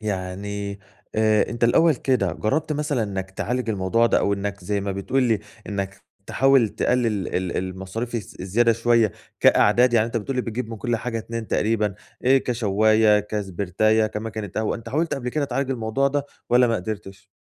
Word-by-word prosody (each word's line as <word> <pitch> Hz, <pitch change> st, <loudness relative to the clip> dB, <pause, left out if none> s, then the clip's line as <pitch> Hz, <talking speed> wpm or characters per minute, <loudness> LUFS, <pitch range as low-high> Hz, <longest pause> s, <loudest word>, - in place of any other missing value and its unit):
يعني 100 Hz, 0 st, -4 dB, 0.4 s
آآ، 110 Hz, -1 st, +3 dB
أنت 120 Hz, 0 st, -1 dB
الأول 160 Hz, +7 st, +4 dB
كده 130 Hz, -1 st, 0 dB
جربت 155 Hz, +8 st, -1 dB
مثلًا 145 Hz, -5 st, -1 dB
إنك 95 Hz, -2 st, -4 dB
تعالج 120 Hz, +4 st, -3 dB
الموضوع 105 Hz, +3 st, +2 dB
ده -, -, +3 dB
أو 100 Hz, -, +1 dB
إنك 100 Hz, -1 st, -4 dB
زي 100 Hz, +1 st, -1 dB
ما 100 Hz, 0 st, -3 dB
بتقول 125 Hz, +7 st, 0 dB
لي 115 Hz, -4 st, +2 dB, 0.3 s
إنك 100 Hz, -1 st, -4 dB, 0.2 s
تحاول 135 Hz, -3 st, +4 dB
تقلل 125 Hz, +3 st, +1 dB, 0.3 s
ال 90 Hz, -1 st, -2 dB
المصاريف 95 Hz, +6 st, -4 dB
الز 110 Hz, -5 st, -5 dB
الزيادة 115 Hz, +5 st, +2 dB
شوية 115 Hz, -3 st, +2 dB, 0.3 s
كأعداد، 125 Hz, 0 st, +5 dB
يعني 115 Hz, -1 st, +3 dB
أنت 115 Hz, -, -4 dB
بتقول 130 Hz, +4 st, -3 dB
لي 125 Hz, -, +1 dB
بتجيب 115 Hz, 0 st, -4 dB
من 115 Hz, -, -5 dB
كُلّ 120 Hz, +2 st, -1 dB
حاجة 115 Hz, 0 st, -3 dB
2 115 Hz, 0 st, -6 dB
تقريبًا، 105 Hz, -2 st, +1 dB, 0.3 s
آآ، 135 Hz, +2 st, +6 dB
كشواية، 110 Hz, -3 st, +3 dB
كسبرتاية، 105 Hz, +1 st, 0 dB
كمكنة 110 Hz, -1 st, -5 dB
قهوة، 110 Hz, 0 st, 0 dB
أنت 115 Hz, 0 st, -10 dB
حاولت 155 Hz, +7 st, 0 dB
قبل 125 Hz, -2 st, -4 dB
كده 150 Hz, +3 st, -1 dB
تعالج 135 Hz, 0 st, -2 dB
الموضوع 125 Hz, +2 st, 0 dB
ده، 145 Hz, 0 st, -1 dB, 0.3 s
والّا 125 Hz, +1 st, +5 dB
ما 115 Hz, -, +1 dB
قدرتش؟ 100 Hz, -1 st, -6 dB
110 Hz, 175 wpm, -23 LUFS, 100-120 Hz, 0.4 s, آآ